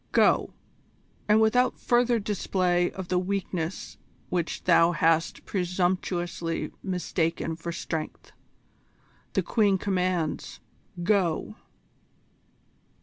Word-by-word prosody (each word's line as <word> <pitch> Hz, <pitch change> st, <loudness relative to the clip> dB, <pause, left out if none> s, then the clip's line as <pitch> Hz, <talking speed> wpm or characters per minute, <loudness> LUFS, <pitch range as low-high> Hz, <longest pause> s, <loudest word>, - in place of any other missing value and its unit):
Go, -, -, +4 dB, 0.8 s
and 210 Hz, +1 st, +5 dB
without 250 Hz, +3 st, +3 dB
further 240 Hz, 0 st, +2 dB
display 185 Hz, -4 st, 0 dB
of 190 Hz, -2 st, -7 dB
the 180 Hz, -, +2 dB
weakness 185 Hz, -2 st, -3 dB, 0.3 s
which 175 Hz, -2 st, -2 dB
thou 170 Hz, -1 st, +5 dB
hast 165 Hz, 0 st, +1 dB
presumptuously 175 Hz, -2 st, -1 dB
mistaken 170 Hz, -3 st, -1 dB
for 170 Hz, +1 st, -5 dB
strength. 160 Hz, -2 st, -5 dB, 1.0 s
The -, -, +1 dB
Queen 205 Hz, -4 st, +2 dB
commands 180 Hz, -4 st, -1 dB, 0.4 s
go!" 195 Hz, 0 st, +1 dB
180 Hz, 90 wpm, -27 LUFS, 170-200 Hz, 1.0 s, and